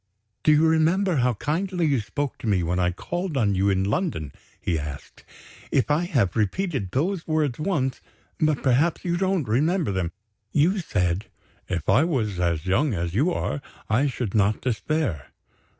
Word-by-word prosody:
"Do 155 - +4
you 150 +1 +5
remember 165 +3 +2
how 125 -2 +2
kindly 175 - -1
you 140 -4 +2
spoke 135 +6 -4
to - - -5
me 95 -4 +2
when 90 +2 0
I 90 -1 +3
called 175 - -3
on 105 -5 +2
you 95 +1 +2
in 95 -1 +2
London?" 100 - -1 0.3
he 80 -3 -1
asked. 75 -2 -8 0.5
"If 135 +2 +2
I 160 +4 +2
have 120 - +1
repeated 120 - -1
those 165 - -1
words 155 -5 0
once 150 -7 -1 0.4
but 155 -3 +1
perhaps 140 +8 +2
you 175 -1 +1
don't 185 -4 0
remember 150 - +1
them? 95 -3 -1 0.4
You 175 +7 +3
said: 90 - -1 0.4
'If 90 -4 -2
I 140 - +5
was 115 - -1
as 85 -2 0
young 110 +7 +2
as 85 -1 -2
you 145 - +2
are, 145 - -2 0.3
I 130 +7 +3
should 125 -6 -3
not 105 0 +2
despair. 125 - -1
130 Hz, 170 wpm, -25 LUFS, 95-160 Hz, 0.5 s, you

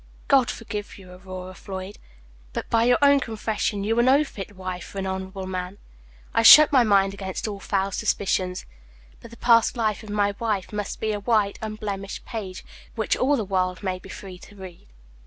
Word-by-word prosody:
God 270 -3 +4
forgive 210 -2 -6
you, 185 -2 -14
Aurora 185 0 -9
Floyd; 190 +1 -8 0.5
but, - - -4
by 230 0 +3
your 245 0 +4
own 280 0 +6
confession, 215 -3 -2
you 225 +3 +1
are - - +6
no 265 +4 +5
fit 205 -7 -9
wife 185 -1 -5
for - - -11
an 195 - -2
honorable 190 0 -5
man. 185 +1 -5 0.6
I - - +3
shut 300 +7 +10
my 265 -3 +6
mind 195 -3 +3
against 190 +1 -5
all 205 -2 -5
foul 195 0 -1
suspicions; 185 -2 -1 0.5
but 235 - -12
the 235 - -14
past 230 +1 +4
life 215 -3 0
of 215 - -12
my 205 -1 +1
wife 215 -4 -2
must 205 -1 -4
be 220 - -1
a 210 - -2
white, 205 -2 +1
unblemished 205 -2 -5
page, 195 -5 -6 0.3
which 220 -2 0
all 280 +3 +2
the 220 - -2
world 185 0 -1
may 185 -1 -2
be - - -14
free 185 -2 -9
to 205 - -15
read." 185 - -11
205 Hz, 195 wpm, -24 LUFS, 190-225 Hz, 0.6 s, shut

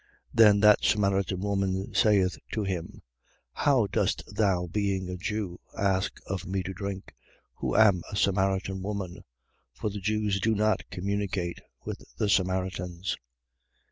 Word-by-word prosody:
4:9. - - -34 0.3
Then 105 -3 +7
that 105 0 +6
Samaritan 100 -3 +1
woman 95 -1 -1
saith 100 -4 +3
to 110 - 0
him: 90 -4 -4 0.5
How 135 - +3
dost 100 - 0
thou, 95 -5 +2
being 95 0 -1
a 90 - -4
Jew; 95 -1 -3 0.2
ask 95 -1 0
of 95 -1 -4
me 95 0 -1
to 95 +2 -5
drink, 100 0 -6 0.4
who - - -3
am 100 -5 +5
a - - -4
Samaritan 95 -1 +1
woman? 100 -1 -4 0.5
For 105 - -3
the 100 - -5
Jews 105 -1 0
do 110 +3 +2
not 105 -1 +1
communicate 95 -2 -2 0.2
with - - -5 0.2
the 105 - 0
Samaritans. 95 -1 0
95 Hz, 140 wpm, -28 LUFS, 95-105 Hz, 0.5 s, Then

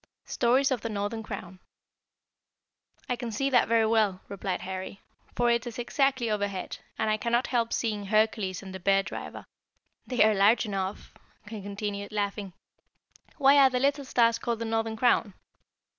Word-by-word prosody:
STORIES 260 +3 +2
OF 250 -4 0
THE 230 - -4
NORTHERN 205 +2 -3
CROWN. 185 -3 -8 1.5
"I 250 - 0
can 240 -1 -5
see 275 +6 -1
that 245 -2 +4
very 230 -1 +3
well," 215 -4 +2
replied 195 -2 -3
Harry, 190 +1 -6 0.4
"for 240 -1 +2
it 235 +1 0
is 235 - -7
exactly 260 0 +1
overhead, 200 -3 -3 0.2
and 220 - 0
I 215 - +1
cannot 235 +3 0
help 235 -2 0
seeing 210 -3 -2
Hercules 215 -3 +1
and 190 -1 -9
the 190 - -6
Bear 195 +1 +3
driver. - - -7 0.6
They 250 -4 +3
are 215 0 +4
large 205 +5 +4
enough," 195 -1 -4 0.3
he 215 -1 -7
continued, 200 0 -5
laughing. 200 -2 -3 0.8
"Why 280 -1 +6
are 270 -1 +7
the 255 -1 -1
little 280 +2 +1
stars 235 -3 +2
called 235 -1 -2
the 230 - -4
Northern 225 0 -1
Crown?" 225 -4 +2
220 Hz, 165 wpm, -28 LUFS, 200-240 Hz, 1.5 s, are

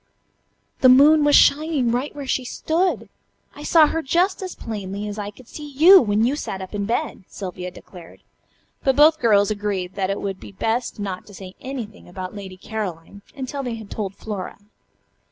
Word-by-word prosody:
"The 255 - +6
moon 295 +4 +7
was 290 0 +5
shining 290 -5 +4
right 255 +5 -2
where 285 -1 -6
she 260 0 -1
stood. 330 +8 -1 0.5
I - - -10
saw 315 +1 +5
her 325 +2 -1
just 350 +7 +1
as 370 -1 -6
plainly 205 -2 -5
as 210 +1 -6
I 205 0 -4
could 225 +4 -16
see 295 +2 -9
you 350 +8 +8
when 215 -1 +1
you 265 +4 +1
sat 195 -9 -5
up 190 +1 -8
in 200 -1 -2
bed," 235 +2 -2
Sylvia 180 -2 -6
declared. 175 -1 -14 0.6
But 270 -1 +2
both 310 +3 +6
the - - -28
girls 210 -3 +4
agreed 200 -3 -3
that 190 -1 -2
it 195 - -2
would 195 -2 -4
be - - -12
best 225 +3 -2
not 195 -3 -5
to 205 - -13
say 185 -1 -10
anything 235 -8 -7
about 185 0 -7
"Lady 190 -2 -8
Caroline" 200 -2 -6
until 275 +1 -5
they 245 -3 -4
had 220 -3 -11
told 200 -3 -4
Flora. 205 -3 -6
220 Hz, 190 wpm, -22 LUFS, 200-285 Hz, 0.6 s, you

